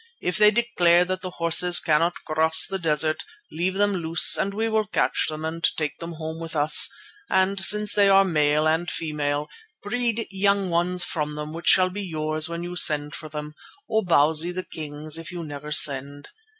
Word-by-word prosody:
If 180 Hz, -, -2 dB
they 210 Hz, 0 st, +7 dB
declare 180 Hz, -6 st, +2 dB
that 185 Hz, +1 st, -4 dB
the 185 Hz, -, -6 dB
horses 175 Hz, +1 st, +3 dB
cannot 165 Hz, +3 st, -1 dB
cross 160 Hz, +1 st, +3 dB
the 195 Hz, 0 st, -5 dB
desert, 155 Hz, -1 st, -1 dB, 0.3 s
leave 175 Hz, +4 st, -2 dB
them 205 Hz, +1 st, +1 dB
loose 165 Hz, -2 st, +4 dB
and 200 Hz, -, 0 dB
we 220 Hz, +3 st, -2 dB
will 220 Hz, -1 st, -1 dB
catch -, -, -1 dB
them 155 Hz, 0 st, -6 dB
and 165 Hz, +1 st, -6 dB
take 150 Hz, -2 st, -4 dB
them 170 Hz, 0 st, -7 dB
home 160 Hz, 0 st, -7 dB
with 165 Hz, -1 st, -8 dB
us, 150 Hz, +1 st, +4 dB, 0.4 s
and 190 Hz, +1 st, +1 dB
since 210 Hz, +2 st, +3 dB
they 200 Hz, -1 st, +3 dB
are 195 Hz, 0 st, +5 dB
male 150 Hz, -3 st, +1 dB
and 165 Hz, +2 st, 0 dB
female, 150 Hz, -2 st, -3 dB, 0.4 s
breed 230 Hz, +1 st, -2 dB
young 200 Hz, -1 st, 0 dB
ones 180 Hz, +1 st, 0 dB
from 150 Hz, -4 st, -4 dB
them 150 Hz, +1 st, -7 dB
which 165 Hz, +1 st, -8 dB
shall 185 Hz, -1 st, +4 dB
be 205 Hz, +2 st, -6 dB
yours 155 Hz, -3 st, -2 dB
when 170 Hz, 0 st, -5 dB
you 175 Hz, 0 st, -7 dB
send 150 Hz, -4 st, +2 dB
for 155 Hz, -, -8 dB
them, 150 Hz, 0 st, -7 dB, 0.3 s
or 220 Hz, -1 st, 0 dB
Bausi 160 Hz, 0 st, +2 dB
the 185 Hz, +1 st, -6 dB
king's 155 Hz, 0 st, -5 dB
if 165 Hz, +1 st, -9 dB
you 175 Hz, -1 st, -7 dB
never 150 Hz, 0 st, -9 dB
send. 140 Hz, 0 st, +1 dB
165 Hz, 190 wpm, -23 LUFS, 155-190 Hz, 0.4 s, they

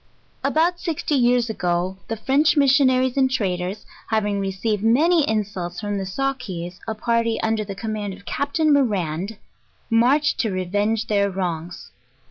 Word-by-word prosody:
About 345 Hz, +3 st, +2 dB
sixty 320 Hz, -3 st, -2 dB
years 245 Hz, -3 st, +3 dB
ago, 180 Hz, -3 st, -1 dB
the 225 Hz, -, -3 dB
French 290 Hz, +7 st, +2 dB
missionaries 260 Hz, -2 st, +4 dB
and 265 Hz, -1 st, +4 dB
tra 200 Hz, -8 st, 0 dB
ders, 180 Hz, +4 st, -5 dB, 0.2 s
having 210 Hz, -2 st, 0 dB
received 195 Hz, +2 st, -1 dB
many 300 Hz, +7 st, +3 dB
insults 195 Hz, -5 st, -2 dB
from 205 Hz, -1 st, -2 dB
the 190 Hz, -, -4 dB
Sawkees, 190 Hz, -7 st, -4 dB
a 220 Hz, -, -2 dB
par 230 Hz, +1 st, +1 dB
ty 230 Hz, -1 st, -1 dB
under 220 Hz, -1 st, +1 dB
the 200 Hz, -1 st, -7 dB
command 210 Hz, -1 st, -4 dB
of 200 Hz, +1 st, -18 dB
Capt. 285 Hz, +3 st, -2 dB
Morand, 210 Hz, -, +1 dB, 0.5 s
marched 270 Hz, +7 st, +3 dB
to 225 Hz, -, +1 dB
revenge 205 Hz, +4 st, -1 dB
their 200 Hz, -1 st, +1 dB
wrongs. 175 Hz, -3 st, -4 dB
220 Hz, 150 wpm, -22 LUFS, 195-260 Hz, 0.5 s, missionaries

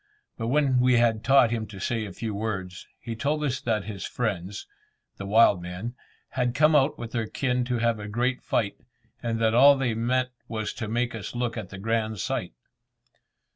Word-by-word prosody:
But 115 Hz, -, -4 dB
when 135 Hz, -1 st, +3 dB
we 125 Hz, 0 st, +4 dB
had 115 Hz, -2 st, +2 dB
taught 135 Hz, -4 st, +5 dB
him 110 Hz, -2 st, -2 dB
to 100 Hz, -3 st, -10 dB
say 110 Hz, +3 st, -1 dB
a -, -, -8 dB
few 110 Hz, +3 st, -4 dB
words, 95 Hz, -4 st, -4 dB
he 115 Hz, -, -6 dB
told 150 Hz, +6 st, -1 dB
us 135 Hz, -2 st, -1 dB
that 110 Hz, -4 st, 0 dB
his 100 Hz, -2 st, -6 dB
friends 100 Hz, -4 st, -3 dB, 0.5 s
the 100 Hz, -, -6 dB
wild 105 Hz, -3 st, +5 dB
men 90 Hz, +7 st, -5 dB, 0.4 s
had 125 Hz, -2 st, -1 dB
come 155 Hz, +2 st, +5 dB
out 140 Hz, 0 st, +3 dB
with 115 Hz, -1 st, -7 dB
their 115 Hz, -2 st, -2 dB
kin 125 Hz, +1 st, 0 dB
to 125 Hz, -1 st, -1 dB
have 115 Hz, -1 st, +1 dB
a 105 Hz, -, -6 dB
great 120 Hz, +4 st, -1 dB
fight, 100 Hz, -4 st, -1 dB, 0.4 s
and 115 Hz, -1 st, -2 dB
that 110 Hz, -1 st, +2 dB
all 140 Hz, +4 st, +7 dB
they 130 Hz, -4 st, 0 dB
meant 125 Hz, +3 st, 0 dB, 0.2 s
was 110 Hz, -2 st, -3 dB
to 110 Hz, -, -5 dB
make 120 Hz, +3 st, -1 dB
us 110 Hz, 0 st, -6 dB
look 120 Hz, -1 st, -1 dB
at 95 Hz, -, -6 dB
the 100 Hz, -, -8 dB
grand 110 Hz, +1 st, -1 dB
sight. -, -, -2 dB
115 Hz, 200 wpm, -26 LUFS, 105-125 Hz, 0.5 s, all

